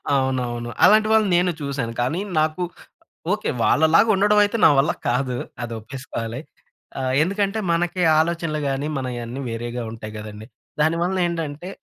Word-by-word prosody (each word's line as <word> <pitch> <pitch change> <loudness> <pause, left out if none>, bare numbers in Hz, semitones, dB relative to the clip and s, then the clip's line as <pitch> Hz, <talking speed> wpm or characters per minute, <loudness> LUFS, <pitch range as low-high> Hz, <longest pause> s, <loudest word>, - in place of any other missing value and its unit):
అవునవును. 125 -3 -1
అలాంటి 215 +1 +6
వాళ్ళని 215 -3 +4
నేను 180 0 +2
చూశాను, 135 -5 -3
కానీ 150 +9 -1 0.2
నాకు 155 +3 0 0.7
ఓకే. 210 - -1
వాళ్ళలాగుండడవైతే 205 +6 +4
నా - - +9
వల్ల 140 - +3 0.2
కాదు. 125 +1 0 0.3
అది 120 -1 -5
ఒప్పేసుకోవాలి. 115 0 -6 0.6
ఆహ్, 130 -1 -1
ఎందుకంటే, 200 +4 0
మనకీ 175 +2 0 0.2
ఆలోచనలు 165 -2 -1
గానీ, 135 +2 -2
మనయన్నీ 125 -1 -4
వేరేగా 120 +1 -4
ఉంటాయి 110 -1 -8
గదండీ. 105 0 -9 0.3
దాని 160 +2 +3
వలన 185 +2 0
ఏంటంటే, 165 0 -4
145 Hz, 130 wpm, -22 LUFS, 120-180 Hz, 0.7 s, నా